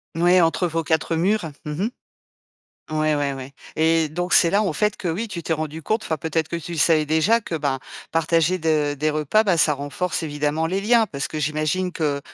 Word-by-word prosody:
Mouais, 175 +2 +4
entre 165 +2 +2
vos 165 0 -2
4 160 +1 0
murs. 175 0 0
Mmh 150 - -4
mh. - - -1 1.0
Ouais, 155 -1 +1
ouais, 145 -1 0
ouais. 135 0 -8 0.2
Et 160 0 +2
donc, 175 +3 -3
c'est 170 - +6
là, 205 +3 +3
en 195 -6 0
fait, 210 +6 0
que 180 - -4
oui, 190 +8 -2
tu 185 -6 -6
t'es 165 - -1
rendu 155 0 -4
compte 220 +7 -1
enfin, 160 - -1
peut-être 160 +1 -1
que - - -6
tu 170 0 -7
le 165 - -4
savais 155 0 +4
déjà, 160 +10 +3
que 175 -6 -4
ben, 140 -3 -1 0.3
partager 165 +2 +2
de 155 -3 +1
des 155 +2 0
repas, 155 +8 +2
bah, 190 -5 +2
ça 155 -1 +4
renforce 145 +7 -3
évidemment 150 +1 -1
les 190 +3 -1
liens. 225 +2 +3
Parce 140 -7 -4
que 155 - -6
j'imagine 155 +5 -1
que, 150 -4 -1
160 Hz, 220 wpm, -22 LUFS, 150-180 Hz, 1.0 s, c'est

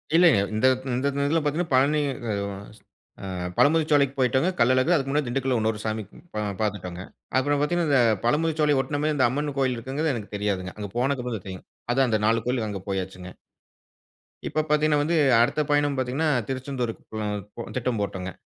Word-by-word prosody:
இல்லங்க. 170 - +6 0.2
இந்த 110 - +1 0.3
இந்த 130 +3 0 0.2
இதுல 165 +3 +2
பாத்தீங்கனா 160 +2 -1
பழனி 145 +4 +3 1.2
ஆ - - -5 0.3
பழமுதிர்ச்சோலைக்கு 145 -3 +3
போய்டோங்க. 130 +6 +2
கள்ளழகர் 130 +7 +4
அதுக்கு 135 -2 -1
முன்னாடி 150 -2 0
திண்டுக்கல்லுல 130 -1 0
இன்னொரு 110 -1 0
சாமி 110 0 -2 0.6
பார்த்துட்டோங்க. 95 -4 -3 0.4
அப்புற 145 +2 +2
பார்த்தீங்கனா, 170 +2 +1
இந்த 135 -3 +5 0.2
பழமுதிர்ச்சோலை 150 +2 +2
ஒட்டின 145 +2 -2
மேரி 155 0 +1
இந்த 130 -4 +4
அம்மன் 145 +3 -2
கோவில் 130 -2 +1
இருக்குங்கிறது 140 +6 -2
எனக்கு 105 -2 -8
தெரியாதுங்க. 100 -2 -2
அங்க 105 -1 -5
போனதுகப்புற 125 -2 -1
தான் 95 - -15
தெரியும். 95 -1 -8 0.3
அதா 135 +1 +3
அந்த 110 - +1
4 115 +1 +2
கோயிலுக்கு 120 -4 0
அங்க 100 - -5
போயாச்சுங்க. 95 -1 -4 1.2
இப்ப 155 - 0
பார்த்தீங்கனா 150 0 +3
வந்து 165 +3 0 0.3
அடுத்த 135 +6 +2
பயணம் 145 -1 +2
பார்த்தீங்கனா 130 +5 0 0.2
திருச்செந்தூருக்கு 130 -3 -4
பி 105 +1 -5
திட்டம் 125 -3 -1
போட்டோங்க. 95 -2 -4
130 Hz, 155 wpm, -25 LUFS, 110-150 Hz, 1.2 s, இல்லங்க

